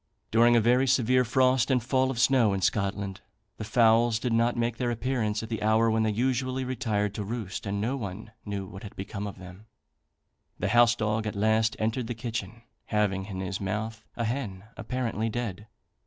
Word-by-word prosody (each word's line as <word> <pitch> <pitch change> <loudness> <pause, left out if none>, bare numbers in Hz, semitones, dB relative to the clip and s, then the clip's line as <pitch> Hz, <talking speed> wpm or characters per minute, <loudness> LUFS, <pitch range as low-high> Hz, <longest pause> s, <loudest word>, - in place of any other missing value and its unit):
During 120 +2 +5
a - - +6
very 125 +4 +3
severe 125 0 +3
frost 130 +1 +2
and 125 -3 +2
fall 130 +2 +1
of 130 - -3
snow 120 -4 +4
in 95 - -2
Scotland, 100 0 -1 0.4
the - - -5
fowls 115 +1 +4
did 120 0 -2
not 115 +1 +2
make 115 -1 -1
their 125 -2 -1
appearance 115 -3 -1
at 110 - -7
the 110 -2 -3
hour 110 +2 +3
when 110 0 +2
they 110 - +2
usually 130 +3 0
retired 110 -6 -1
to 105 - -4
roost, 105 -2 -5
and 100 +1 -2
no 115 +6 -1
one 105 -1 -6
knew 100 -2 -4
what 95 +1 -10
had 105 - -10
become 100 +1 -5
of 100 - -8
them; 90 +3 -12 0.9
the 100 - -1
house 120 +1 +5
dog 110 -1 -1
at 105 - -4
last 110 +1 +2
entered 115 +2 -1
the 120 - -4
kitchen, 115 -1 -5 0.2
having 100 -3 0
in 95 -3 -5
his 95 +1 -4
mouth 110 +3 -3
a 115 - -1
hen, 110 -6 -3
apparently 115 -1 -2
dead. 105 -3 -4
110 Hz, 195 wpm, -27 LUFS, 105-120 Hz, 0.9 s, a